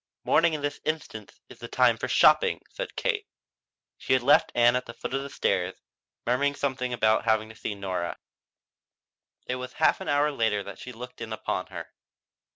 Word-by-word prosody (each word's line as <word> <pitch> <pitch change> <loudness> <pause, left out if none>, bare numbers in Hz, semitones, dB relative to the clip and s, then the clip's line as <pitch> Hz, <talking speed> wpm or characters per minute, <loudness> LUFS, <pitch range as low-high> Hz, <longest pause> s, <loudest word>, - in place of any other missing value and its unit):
"Morning 165 0 +3
in 145 - -6
this 145 0 -3
instance 155 0 -5
is - - -14
the - - -7
time - - +4
for - - -4
shopping," 475 -1 +4
said - - -6
Kate. 430 -4 -1 0.7
She - - 0
had 130 -2 +3
left 145 +3 +5
Ann 120 0 +5
at 125 - -2
the 115 - -9
foot - - -6
of 135 - 0
the 140 - -6
stairs, 95 -8 0 0.5
murmuring 140 +4 +1
something 130 -3 -2
about 110 -2 +2
having 110 -1 +2
to 110 - -12
see 105 - -4
Nora. 95 -3 -3 1.3
It 125 - -2
was 125 0 -7
a - - -19
half - - +3
hour 145 +1 +2
later 110 -6 0
that 100 - -9
she 125 - -8
looked 125 0 -10
in 115 -1 -6
upon 110 - -3
her. - - -7
125 Hz, 190 wpm, -27 LUFS, 110-145 Hz, 1.3 s, left